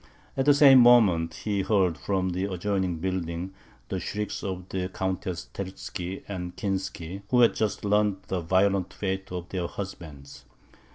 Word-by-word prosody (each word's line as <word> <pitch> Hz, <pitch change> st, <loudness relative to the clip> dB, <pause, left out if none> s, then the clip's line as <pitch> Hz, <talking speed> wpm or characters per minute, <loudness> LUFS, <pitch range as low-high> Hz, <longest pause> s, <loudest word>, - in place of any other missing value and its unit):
At 135 Hz, -, 0 dB
the 145 Hz, -, +7 dB
same 140 Hz, -2 st, +8 dB
moment, 110 Hz, -10 st, +5 dB
he 100 Hz, -2 st, 0 dB
heard, 95 Hz, -4 st, +2 dB
from 95 Hz, +2 st, -1 dB
the 95 Hz, +2 st, -2 dB
adjoining 95 Hz, -1 st, -1 dB
building, 90 Hz, +1 st, -3 dB, 0.4 s
the 95 Hz, -, -2 dB
shrieks 105 Hz, +4 st, -4 dB
of 90 Hz, -2 st, -4 dB
the 90 Hz, -1 st, -2 dB
Countesses 95 Hz, -8 st, -3 dB
Terzky 95 Hz, -1 st, -6 dB
and 90 Hz, -3 st, -5 dB
Kinsky, 95 Hz, -2 st, -4 dB
who 125 Hz, -1 st, +4 dB
had 120 Hz, -, +6 dB
just 110 Hz, -1 st, -2 dB
learnt 105 Hz, -1 st, +1 dB
the 95 Hz, -, -3 dB
violent 95 Hz, +2 st, +1 dB
fate 95 Hz, -1 st, -3 dB
of 90 Hz, -1 st, -5 dB
their 90 Hz, -3 st, -2 dB
husbands. 80 Hz, -9 st, -8 dB
95 Hz, 155 wpm, -27 LUFS, 90-100 Hz, 0.4 s, same